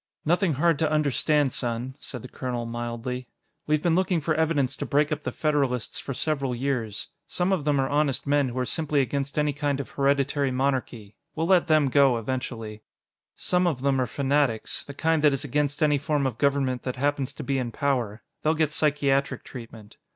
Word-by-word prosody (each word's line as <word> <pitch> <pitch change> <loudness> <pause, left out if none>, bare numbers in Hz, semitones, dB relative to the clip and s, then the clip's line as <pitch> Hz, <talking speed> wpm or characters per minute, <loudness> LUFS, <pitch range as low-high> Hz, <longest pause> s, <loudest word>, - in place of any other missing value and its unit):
"Nothing 175 +1 +2
hard 165 +2 +2
to 160 -2 +1
understand, 150 -1 +2
son," 120 +1 -2
said 125 -4 -7
the - - -7
colonel 125 -2 -4
mildly. 120 +2 -4 0.4
"We've 150 0 +1
been 170 - +3
looking 185 0 +2
for 155 +1 0
evidence 150 -4 +1
to 145 - -3
break 145 +3 +2
up 155 0 -1
the - - -3
Federalists 140 -6 0
for 135 - -5
several 140 -4 -1
years. 120 -5 -2 0.2
Some 180 +2 0
of 160 -7 -1
them 145 -2 +2
are 135 - +1
honest 145 -2 +1
men 145 -2 +2
who 120 - -7
are 130 - 0
simply 150 0 0
against 140 +2 -2
any 150 -1 +2
kind 145 -1 -1
of 140 - -6
hereditary 140 0 +1
monarchy 125 -5 -2 0.2
we'll 160 - 0
let 180 -1 +4
them 155 -3 +4
go 135 -2 +4
eventually. 115 -2 -4 0.5
Some 180 0 +1
of 135 -7 -1
them 135 -2 +2
are 125 - 0
fanatics 140 -2 0
the 140 - -10
kind 160 +1 +1
that 150 -2 +5
is 135 - -2
against 145 +2 0
any 150 -2 +3
form 145 -1 0
of 125 -4 -2
government 135 -3 +1
that 125 - -4
happens 140 0 0
to - - -7
be 135 -1 0
in 120 -2 -3
power; 120 -5 -1 0.2
they'll 155 +1 +2
get 155 -2 +1
psychiatric 140 -2 +1
treatment. 115 -4 -11
140 Hz, 195 wpm, -26 LUFS, 125-150 Hz, 0.5 s, that